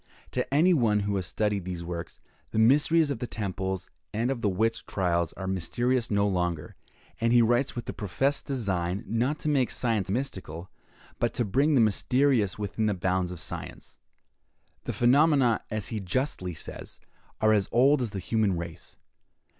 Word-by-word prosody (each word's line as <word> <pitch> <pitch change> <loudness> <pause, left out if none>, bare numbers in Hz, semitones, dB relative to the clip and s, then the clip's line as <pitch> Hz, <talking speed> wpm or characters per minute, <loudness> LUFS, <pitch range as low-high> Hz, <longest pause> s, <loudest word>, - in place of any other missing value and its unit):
To - - -2
any 165 +6 +5
one 110 -8 +2
who 100 0 -1
has 90 -2 -3
studied 105 -1 -1
these 90 -1 -5
works, 85 -1 -6 0.3
the - - -5
mysteries 145 +7 +4
of 130 - -3
the 125 - -3
temples 95 -3 -3 0.2
and 115 +4 0
of 125 -3 -3
the 105 - +2
witch 110 +4 0
trials 85 -3 0
are 95 - -7
mysteries 115 +7 0
no 100 -1 +2
longer; 90 -5 -2 0.4
and 115 0 +2
he 120 -1 +6
writes 120 +4 +1
with 120 - -5
the - - -5
professed 135 +8 -1
design, 100 -7 -1
not 125 +7 0
to - - -2
make 140 -5 +2
science 110 -6 -1
mystical, 95 - -4 0.5
but 120 - 0
to 120 - +1
bring 140 +9 +2
the 125 - +5
mysterious 115 -1 +2
within 105 +1 -2
the 105 - +1
bounds 90 0 0
of 90 - -7
science. - - -8 0.9
The - - -2
phenomena, 135 -2 +4
as 110 -2 -3
he 110 - -3
justly 95 - -2
says, 75 - -9 0.4
are 110 0 +4
as 100 -3 +1
old 135 +4 +4
as 120 - -1
the 100 - -6
human 100 -1 0
race. 85 -1 -8
110 Hz, 175 wpm, -27 LUFS, 95-125 Hz, 0.9 s, he